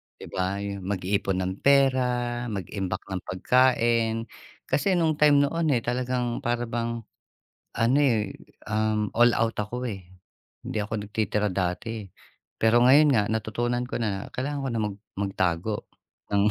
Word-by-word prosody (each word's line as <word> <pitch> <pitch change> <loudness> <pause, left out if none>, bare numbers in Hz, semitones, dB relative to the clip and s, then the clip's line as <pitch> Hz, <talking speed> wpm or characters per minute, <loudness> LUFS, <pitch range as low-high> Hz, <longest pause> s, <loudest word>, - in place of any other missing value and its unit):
Di - - -13
ba, 95 +1 -1
'yung 100 -2 -5
mag-iipon 95 0 -1
ng 95 +1 -4
pera, 125 -3 +2
mag-imbak 95 -2 -4
ng 95 -1 -3
pagkain, 115 +2 +2 0.5
kasi 145 +8 +2
no'ng 160 -3 +1
time 145 -1 +6
noon, 165 +3 0
eh, 115 - -1
talagang 125 -1 -1
para 120 0 -1
bang 115 0 -3 0.7
ano, 120 +5 +2
eh, 110 -7 +1 0.3
um, 110 -1 0
all 120 +1 +6
out 115 -1 0
ako, 125 +4 -4
eh, 100 -5 -5 0.6
hindi - - -3
ako 105 0 -4
nagtitira 105 0 0
dati, 95 +5 -2
eh. - - -12 0.5
Pero 115 +2 +4
ngayon 145 +4 +7
nga, 110 - +4
natutunan 120 +3 -1
ko - - -7
na 100 -3 -2
kailangan 140 +2 -2
ko - - -1
na 115 - 0
mag 100 - -9 0.2
magtago 95 0 -1 0.5
ng 100 +1 +4
115 Hz, 150 wpm, -26 LUFS, 100-125 Hz, 0.7 s, ngayon